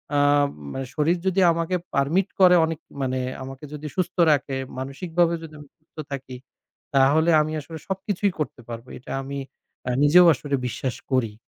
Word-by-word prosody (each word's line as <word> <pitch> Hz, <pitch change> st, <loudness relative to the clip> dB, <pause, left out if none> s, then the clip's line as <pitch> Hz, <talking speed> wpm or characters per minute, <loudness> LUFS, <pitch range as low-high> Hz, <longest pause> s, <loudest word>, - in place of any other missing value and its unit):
আ -, -, +3 dB, 0.6 s
মানে 135 Hz, -, -4 dB
শরীর 160 Hz, +3 st, +2 dB
যদি 190 Hz, +1 st, +2 dB
আমাকে 165 Hz, +2 st, -1 dB, 0.2 s
permit 160 Hz, +8 st, +2 dB
করে 180 Hz, -1 st, +7 dB
অনেক 160 Hz, -1 st, -4 dB, 0.2 s
মানে 130 Hz, -1 st, -1 dB, 0.2 s
আমাকে 135 Hz, +2 st, -9 dB
যদি 150 Hz, 0 st, -6 dB
সুস্থ 185 Hz, -1 st, -1 dB, 0.2 s
রাখে, 140 Hz, -2 st, 0 dB, 0.2 s
মানসিকভাবে 165 Hz, +6 st, 0 dB
যদি 160 Hz, -1 st, -10 dB
আমি 145 Hz, -1 st, -13 dB
সুস্থ 155 Hz, -, -45 dB, 0.2 s
থাকি 135 Hz, -2 st, -6 dB, 0.6 s
তাহলে 145 Hz, +5 st, +4 dB
আমি 155 Hz, +1 st, -2 dB
আসলে 160 Hz, +2 st, -9 dB
সবকিছুই 195 Hz, +1 st, -1 dB
করতে 150 Hz, -5 st, -4 dB
পারবো। 115 Hz, +1 st, -7 dB
এটা 125 Hz, -, -11 dB
আমি 140 Hz, +1 st, -5 dB, 0.5 s
আ -, -, +1 dB
নিজেও 175 Hz, +5 st, +7 dB
আসলে 145 Hz, 0 st, -2 dB
বিশ্বাস 125 Hz, +1 st, -3 dB, 0.2 s
করি। 125 Hz, -5 st, +1 dB
150 Hz, 160 wpm, -24 LUFS, 135-170 Hz, 0.6 s, করে